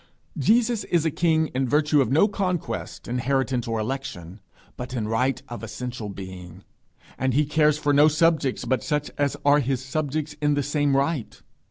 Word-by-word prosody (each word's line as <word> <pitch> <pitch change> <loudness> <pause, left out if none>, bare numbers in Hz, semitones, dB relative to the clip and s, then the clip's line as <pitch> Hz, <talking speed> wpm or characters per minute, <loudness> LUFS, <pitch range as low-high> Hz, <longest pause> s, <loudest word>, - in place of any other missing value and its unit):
Jesus 230 0 +2
is 170 -2 +1
a 160 - +2
king 160 0 +1
in 130 0 0
virtue 150 +1 +3
of 130 - 0
no 160 +9 +5
conquest, 185 -4 -3
inheritance, 125 0 -1
or 115 0 -1
election, 110 -6 -5 0.4
but 125 +1 -6
in 110 -3 -2
right 125 +3 0
of 120 - -7
essential 115 0 -6
being; 95 -2 -9 0.6
and 130 -1 0
he 150 +1 +3
cares 150 0 +3
for 145 -1 +1
no 145 +2 +6
subjects 155 -3 +1
but 130 - 0
such 150 -2 -2
as 145 -1 +1
are 145 +1 +6
his 130 -1 -2
subjects 155 +2 -3
in 145 0 +2
the 145 - 0
same 145 -1 +1
right. 140 -2 -1
140 Hz, 175 wpm, -24 LUFS, 125-150 Hz, 0.6 s, no